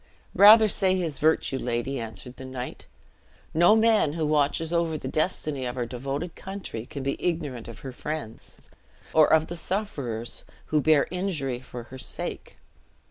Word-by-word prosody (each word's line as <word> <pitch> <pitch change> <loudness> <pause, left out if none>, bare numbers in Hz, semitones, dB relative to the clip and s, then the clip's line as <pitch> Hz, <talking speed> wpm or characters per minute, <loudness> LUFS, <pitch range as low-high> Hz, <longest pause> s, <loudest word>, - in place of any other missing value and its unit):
"Rather 215 +2 +8
say 190 -2 +3
his 170 -6 -2
virtue, 155 -3 +2
lady," 120 +3 -2
answered 115 +2 -7
the - - -9
knight; 130 -1 -7 0.7
"no 175 +6 +6
man 220 -9 +4
who 160 -1 -1
watches 150 +2 +1
over 170 -2 +1
the 135 - -6
destiny 155 -2 -1
of 125 0 -4
our 120 - -1
devoted 135 +8 -4
country 190 - -6
can 140 -3 -6
be 140 +1 -3
ignorant 150 -9 -2
of 115 - -10
her 135 - -6
friends, 145 -3 -7 0.4
or 155 -1 +5
of 160 0 +5
the 175 - -6
sufferers 140 - -3 0.2
who 155 -1 +1
bear 155 -1 +4
injury 165 -9 -2
for 125 -2 -9
her 130 +2 -11
sake. - - -4
150 Hz, 160 wpm, -26 LUFS, 130-170 Hz, 0.7 s, Rather